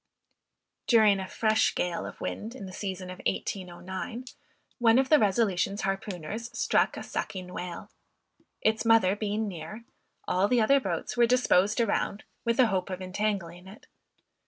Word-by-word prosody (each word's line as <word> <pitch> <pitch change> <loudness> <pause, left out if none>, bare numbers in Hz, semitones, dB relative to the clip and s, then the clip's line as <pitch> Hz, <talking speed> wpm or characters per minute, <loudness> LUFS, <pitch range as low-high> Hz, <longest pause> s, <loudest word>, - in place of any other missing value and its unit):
During 215 -4 +5
a 190 - -4
fresh 220 +2 +2
gale 175 -1 -2
of - - -10
wind 225 +4 -5
in 245 - -8
the 185 - -9
season 190 -2 -5
of 185 - -9
1809, 185 +5 -4 0.5
one 230 -1 +5
of 265 0 +2
the 305 - +6
Resolution's 200 -1 +1
harpooners 195 +2 -4
struck - - +2
a - - -5
sucking 180 -1 -5
whale. 180 +4 -6 0.7
Its 220 0 +2
mother 225 -4 +4
being 210 +1 -2
near, 180 +4 -7 0.4
all 185 +2 +2
the 245 +2 +3
other 275 +5 +5
boats 175 -10 -3
were 240 -1 +4
disposed 225 -4 +3
around, 215 -2 0 0.2
with 235 -1 0
the 255 - +6
hope 190 -4 -1
of 185 -1 -4
entangling 185 -2 -3
it. 200 +3 -13
200 Hz, 155 wpm, -28 LUFS, 185-225 Hz, 0.7 s, the